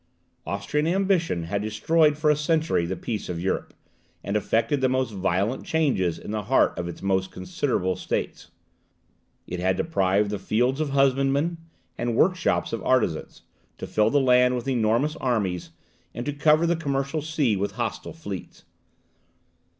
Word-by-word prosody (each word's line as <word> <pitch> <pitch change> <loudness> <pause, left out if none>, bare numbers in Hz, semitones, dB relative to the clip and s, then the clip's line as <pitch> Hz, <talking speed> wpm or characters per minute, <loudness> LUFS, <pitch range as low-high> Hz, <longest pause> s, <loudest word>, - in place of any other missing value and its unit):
Austrian 125 +11 -1
ambition 180 - +1
had 100 +5 -2
destroyed 150 +9 +2
for 155 0 +3
a - - +3
century 155 - +1
the 95 - -2
peace 110 -2 -4
of 85 -2 -3
Europe, 95 +2 -2 0.5
and 100 - -3
effected 115 +6 +1
the 130 - +3
most 130 -3 0
violent 95 +5 -1
changes 125 - +1
in 105 - -8
the 105 0 -2
heart 120 +7 +2
of 85 - -4
its 85 - -8
most 95 -1 +1
considerable 95 - -1
states. 90 - -4 1.0
It 90 - -5
had 95 +1 +1
deprived 100 - +1
the 105 - -3
fields 125 +8 +1
of 155 - -1
husbandmen, 140 +4 +2 0.4
the 120 - -1
workshops 165 +7 +1
of 115 - -2
artisans, 115 -11 0 0.3
to - - -6
fill 105 0 +2
the 145 - +3
land 125 -1 +4
with 125 +2 -4
enormous 120 +4 +1
armies, 100 -9 -1 0.5
and 120 - -4
to 145 - -2
cover 155 +3 +3
the 170 +1 +2
commercial 140 -1 -2
sea 150 -7 0
with 100 +1 -2
hostile 120 -2 -4
fleets. 100 - -8
125 Hz, 160 wpm, -25 LUFS, 100-150 Hz, 1.0 s, land